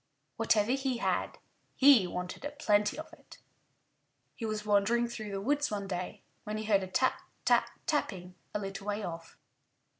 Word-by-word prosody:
Whatever 215 +1 +3
he 265 -2 0
had, - - -1 0.4
he 260 -9 +7
wanted 180 +6 -5
a 290 - -2
plenty 210 -7 +1
of 315 - -8
it. - - -15 1.0
He 225 - -4
was 215 -1 -3
wandering 210 +4 +3
through 220 -3 -6
the 195 -1 -3
woods 290 +6 +1
one 205 -2 -3
day 180 -1 -4 0.2
when 210 0 -4
he 215 - -3
heard 205 -2 +3
a 190 - -4
tap, 255 +8 +1 0.2
tap, - - +4 0.2
tapping 190 - -1 0.2
a - - -1
little 195 0 -6
way 205 +1 -1
off. 165 -2 -7
210 Hz, 170 wpm, -31 LUFS, 195-245 Hz, 1.0 s, he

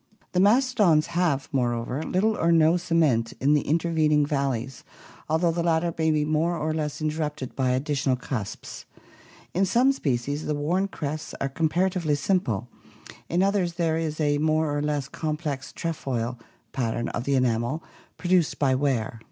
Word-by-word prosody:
The 180 - +1
mastodons 205 - +4
have, 165 -6 +1
moreover, 120 +1 -1
little 210 +7 +1
or 170 -3 +2
no 165 0 +5
cement 160 -10 +1
in 140 +3 +3
the 150 - +3
intervening 155 -2 +2
valleys, 135 -3 -2 0.5
although 165 +2 +2
the 170 +1 -1
latter 165 0 +1
may 160 0 +1
be 150 -1 +2
more 160 +3 +1
or 155 0 -1
less 155 -1 -3
interrupted 150 -4 -3
by 130 -2 +1
additional 135 +1 0
cusps. 125 -5 -6 0.7
In 185 - +2
some 240 +8 +4
species 145 - -2
the 150 - 0
worn 175 +7 0
crests 155 -4 -5
are 135 - -1
comparatively 165 +1 +1
simple, 135 - 0 0.6
in 175 +3 +2
others 195 -3 +1
there 165 -2 0
is 160 -1 -3
a 145 -1 +2
more 155 -1 +1
or 145 - 0
less 145 -2 -1
complex 150 -3 -4
"trefoil" 125 -7 -3 0.3
pattern 120 -2 -2
of 120 - -4
the 140 - +1
enamel 125 +4 0 0.3
produced 180 -3 +1
by 135 -3 +2
wear. 130 -5 0
155 Hz, 155 wpm, -25 LUFS, 135-170 Hz, 0.7 s, no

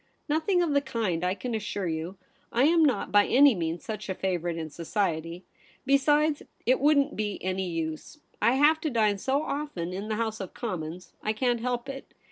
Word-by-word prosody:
' - - -44
Nothing 325 +4 +2
of 330 - 0
the 285 0 +3
kind, 220 -11 -2
I 180 +1 +1
can 240 +5 -5
assure 205 -3 -2
you. 165 +4 -4 0.3
I 240 - +2
am 325 +2 +5
not 260 -9 +1
by 205 0 +5
any 280 +1 +6
means 165 -3 -3
such 215 -2 -5
a 190 - -1
favourite 175 -3 -2
in 160 -2 -5
society. 170 0 -2 0.4
Besides, 295 +2 +3 0.2
it 255 +2 +3
wouldn't 285 0 +3
be 210 -1 -2
any 185 0 -1
use. 160 - -4 0.2
I 230 +4 +4
have 300 +4 +4
to 310 - -1
dine 215 -5 +2
so 275 +7 0
often 280 - -4
in 195 +3 -5
the 215 - -1
House 220 -1 -2
of 190 -3 -7
Com 215 -8 -3
mons; 170 +3 -8
I 215 - 0
can't 240 +1 +1
help 245 +1 -2
it. 270 0 -8
215 Hz, 205 wpm, -27 LUFS, 180-275 Hz, 0.4 s, any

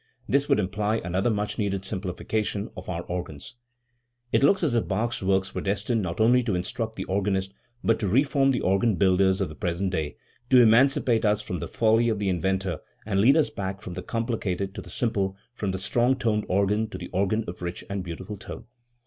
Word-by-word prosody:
This 140 +2 +1
would - - +4
imply 105 +2 0
another 95 +1 0
much 105 0 -2
needed 100 -2 -1
simplification 100 +2 -3
of 90 - -8
our 85 -1 -3
organs*. 85 -3 -6 0.8
It - - +3
looks 185 +7 +4
as 150 -7 +2
if 115 - +1
Bach's 115 +5 -1
works 95 0 +1
were - - -3
destined 105 +4 0
not 90 -1 -4
only 120 +3 +5
to 110 -6 -1
instruct 110 +5 -3
the - - -4
organist 95 0 -1 0.3
but 115 - +2
to 105 - -1
reform 135 +5 +3
the 130 -3 +1
organ 95 +3 +2
builders 95 0 +3
of 95 - +1
the - - -8
present 90 +3 -2
day, 80 -5 -3 0.3
to 130 - +7
emancipate 120 0 +4
us 105 -1 +2
from - - -4
the - - -4
folly 115 +1 +3
of 110 - 0
the 100 -1 -1
inventor 95 0 -1 0.3
and 100 -2 +1
lead 135 +8 +6
us 155 - +2
back 95 -2 -5
from 90 - -6
the - - -5
complicated 105 -5 -2
to - - -6
the - - -13
simple, 100 -5 -1 0.2
from 105 -5 -3
the 95 - -1
strong 120 +7 +2
toned 110 -4 0
organ 100 +3 +2
to - - -6
the - - -8
organ 100 +4 0
of 90 - -7
rich 85 0 -4
and 100 -1 -3
beautiful 95 +4 -7
tone. - - -9
100 Hz, 210 wpm, -26 LUFS, 95-115 Hz, 0.8 s, to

